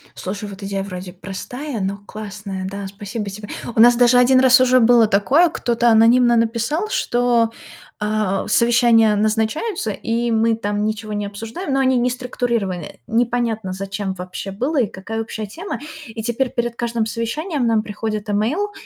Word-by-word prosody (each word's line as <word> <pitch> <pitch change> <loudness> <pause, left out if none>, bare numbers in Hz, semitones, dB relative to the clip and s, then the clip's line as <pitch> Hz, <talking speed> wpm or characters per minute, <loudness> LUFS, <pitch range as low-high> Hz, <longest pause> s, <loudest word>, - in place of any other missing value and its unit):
Слушай, 200 +2 -5
вот 195 0 -10
идея 195 0 -3
вроде 180 -2 -7
простая, 225 +7 -6
но 195 +1 -2
классная. 200 -2 -6
Да, 200 0 -6
спасибо 205 +3 -6
тебе. 205 +1 -9 0.3
У - - 0
нас 240 +1 +8
даже 245 0 +5
1 250 +1 +5
раз 255 -1 +6
уже 255 0 +5
было 235 -1 +5
такое, 265 - +3
кто-то 240 -5 +1
анонимно 235 +2 +5
написал, 230 - 0
что, 240 - +1 0.5
а, 210 -2 -1
совещания 235 -2 +4
назначаются, 220 - 0
и 230 +3 -2
мы 225 0 +2
там 205 -1 -2
ничего 215 0 -3
не 205 0 -2
обсуждаем, 225 - -5
но 270 - +2
они 260 -1 +3
не 245 +1 +2
структурированы, 235 - -2
э. - - -10
Непонятно, 230 -4 0
зачем 195 0 -4
вообще 185 +1 -7
было 260 +8 0
и 220 - +1
какая 220 +5 -5
общая 220 -1 -5
тема. 340 - -6 0.3
И 225 0 -7
теперь 240 +2 -1
перед 235 -1 -2
каждым 235 -1 -1
совещанием 260 - -2
нам 225 -2 +2
приходит 215 0 -4
имейл, 260 - 0
225 Hz, 165 wpm, -20 LUFS, 205-245 Hz, 0.5 s, нас